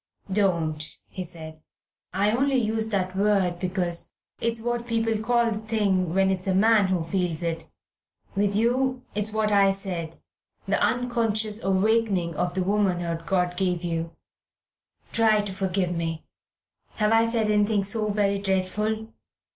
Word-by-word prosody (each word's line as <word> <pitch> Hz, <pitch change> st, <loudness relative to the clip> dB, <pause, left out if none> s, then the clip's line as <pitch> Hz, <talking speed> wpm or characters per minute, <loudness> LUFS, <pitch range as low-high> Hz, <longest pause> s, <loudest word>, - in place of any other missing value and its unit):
"Don't," 165 Hz, -6 st, 0 dB
he 185 Hz, -, -5 dB
said; 160 Hz, -2 st, -9 dB, 0.5 s
"I 200 Hz, +3 st, +2 dB
only 270 Hz, +4 st, +1 dB
used 220 Hz, -2 st, 0 dB
that 185 Hz, -3 st, -1 dB
word 195 Hz, -3 st, +1 dB
because 180 Hz, -2 st, 0 dB, 0.3 s
it's 230 Hz, 0 st, 0 dB
what 240 Hz, +1 st, -2 dB
people 225 Hz, -1 st, 0 dB
call 235 Hz, +1 st, +2 dB
the 210 Hz, -, -2 dB
thing 200 Hz, -6 st, 0 dB
when 190 Hz, 0 st, +3 dB
it's 185 Hz, 0 st, -3 dB
a 190 Hz, -, +2 dB
man 215 Hz, 0 st, +4 dB
who 185 Hz, -3 st, 0 dB
feels 175 Hz, -1 st, -1 dB
it. 165 Hz, -1 st, -3 dB, 0.7 s
With 200 Hz, 0 st, +2 dB
you 250 Hz, +3 st, +1 dB
it's 210 Hz, +1 st, -1 dB
what 215 Hz, 0 st, 0 dB
I 200 Hz, -1 st, +5 dB
said, 180 Hz, -5 st, -5 dB, 0.5 s
the -, -, +1 dB
unconscious 225 Hz, -3 st, 0 dB
awakening 195 Hz, -2 st, +1 dB
of 180 Hz, +2 st, -2 dB
the 185 Hz, -, +1 dB
womanhood 175 Hz, -4 st, 0 dB
God 180 Hz, -1 st, +1 dB
gave 180 Hz, -2 st, -1 dB
you. 165 Hz, -1 st, -3 dB, 1.0 s
Try 220 Hz, -2 st, +4 dB
to 205 Hz, -2 st, -5 dB
forgive 190 Hz, -1 st, -1 dB
me. 165 Hz, -1 st, -3 dB, 0.7 s
Have 210 Hz, 0 st, +1 dB
I 225 Hz, 0 st, +4 dB
said 230 Hz, -2 st, 0 dB
anything 210 Hz, -1 st, +2 dB
so 215 Hz, +2 st, +1 dB
very 200 Hz, -1 st, +1 dB
dreadful? 205 Hz, +3 st, -1 dB
200 Hz, 145 wpm, -25 LUFS, 180-220 Hz, 1.0 s, I